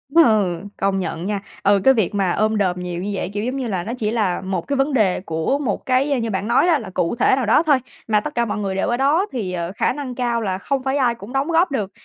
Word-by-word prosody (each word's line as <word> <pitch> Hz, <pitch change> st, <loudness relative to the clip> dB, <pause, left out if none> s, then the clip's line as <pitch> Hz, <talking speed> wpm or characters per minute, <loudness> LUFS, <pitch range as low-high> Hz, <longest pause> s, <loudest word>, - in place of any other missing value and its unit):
ừ, 215 Hz, -, +4 dB, 0.2 s
công 195 Hz, 0 st, 0 dB
nhận 175 Hz, -1 st, -4 dB
nha. 200 Hz, -1 st, -2 dB, 0.2 s
Ừ, 200 Hz, 0 st, +4 dB
cái 265 Hz, -, +6 dB
việc 210 Hz, -4 st, 0 dB
mà 190 Hz, -3 st, +1 dB
ôm 215 Hz, +2 st, +1 dB
đồm 180 Hz, -3 st, 0 dB
nhiều 180 Hz, -1 st, -4 dB
như 205 Hz, -, -3 dB
vậy, 190 Hz, -, -3 dB
kiểu, 205 Hz, +1 st, -2 dB
giống 255 Hz, +3 st, -2 dB
như 255 Hz, -3 st, -2 dB
là, 185 Hz, -5 st, -2 dB
nó 230 Hz, -, -4 dB
chỉ 215 Hz, -2 st, -1 dB
là 205 Hz, -7 st, 0 dB
một 190 Hz, -2 st, -2 dB
cái 280 Hz, -, 0 dB
vấn 270 Hz, +1 st, +1 dB
đề 205 Hz, -7 st, +2 dB
của 165 Hz, -, -1 dB
một 235 Hz, -9 st, -2 dB
cái 260 Hz, 0 st, +1 dB
như 230 Hz, -, -2 dB
bạn 195 Hz, +1 st, -2 dB
nói 250 Hz, +9 st, +3 dB
đó, 325 Hz, -4 st, +4 dB
là 215 Hz, -7 st, -7 dB
cụ 170 Hz, +6 st, 0 dB
thể 255 Hz, -, +3 dB
nào 260 Hz, -3 st, -1 dB
đó 225 Hz, +9 st, +4 dB
thôi. 290 Hz, -4 st, +4 dB, 0.3 s
Mà 210 Hz, -1 st, +3 dB
tất 295 Hz, +6 st, -6 dB
cả 235 Hz, 0 st, +2 dB
mọi 215 Hz, -, -3 dB
người 195 Hz, -2 st, -2 dB
đều 195 Hz, -, 0 dB
ở 240 Hz, -, 0 dB
đó 300 Hz, +8 st, +2 dB
thì, 200 Hz, -8 st, -3 dB
ờ, 170 Hz, 0 st, -3 dB
khả -, -, +1 dB
năng 270 Hz, -4 st, -6 dB
cao 235 Hz, -2 st, -1 dB
là 190 Hz, -3 st, -1 dB
không 270 Hz, +6 st, -2 dB
phải 270 Hz, +1 st, 0 dB
ai 245 Hz, -3 st, +2 dB
cũng 230 Hz, +3 st, -11 dB
đóng 270 Hz, +3 st, 0 dB
góp 330 Hz, -1 st, +3 dB
được, 205 Hz, -7 st, -2 dB
220 Hz, 290 wpm, -21 LUFS, 190-265 Hz, 0.3 s, cái